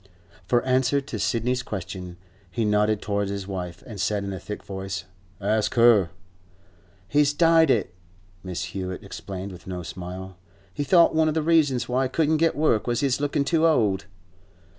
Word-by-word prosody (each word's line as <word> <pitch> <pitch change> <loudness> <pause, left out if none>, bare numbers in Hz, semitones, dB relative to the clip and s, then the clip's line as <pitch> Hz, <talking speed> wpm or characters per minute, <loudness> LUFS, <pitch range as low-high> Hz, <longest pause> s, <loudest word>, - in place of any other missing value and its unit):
For 120 +2 +2
answer 130 +2 +2
to 140 +1 -6
Sidney's 125 +2 0
question, 90 -5 -6 0.3
he 110 +6 -1
nodded 105 0 +2
towards 100 -1 -1
his 100 -1 -4
wife, 90 -3 -6
and 105 -6 -6
said 105 0 0
in 100 0 -4
a 95 - -5
thick 105 - -7
voice, 95 0 -5 0.4
'Ask 105 +2 0
her.' 115 -7 +5 1.0
'He's 145 +3 +3
dyed 165 0 +5
it,' 105 -8 +1 0.5
Mrs. 90 -2 -4
Hewett 95 -1 -5
explained, 95 0 -7
with 90 0 -12
no 90 -1 -5
smile. 90 +2 -7 0.4
'He 145 - -2
thought 170 +4 +5
one 160 0 +3
of 155 - 0
the 160 - +1
reasons 150 -6 +2
why 130 +2 +1
he - - -2
couldn't 155 +2 +2
get 165 +1 +2
work 145 -8 +1
was 120 0 0
his 140 -1 +1
lookin' 145 0 0
too 165 +2 +3
old. 105 -11 +2
110 Hz, 175 wpm, -25 LUFS, 95-140 Hz, 1.0 s, her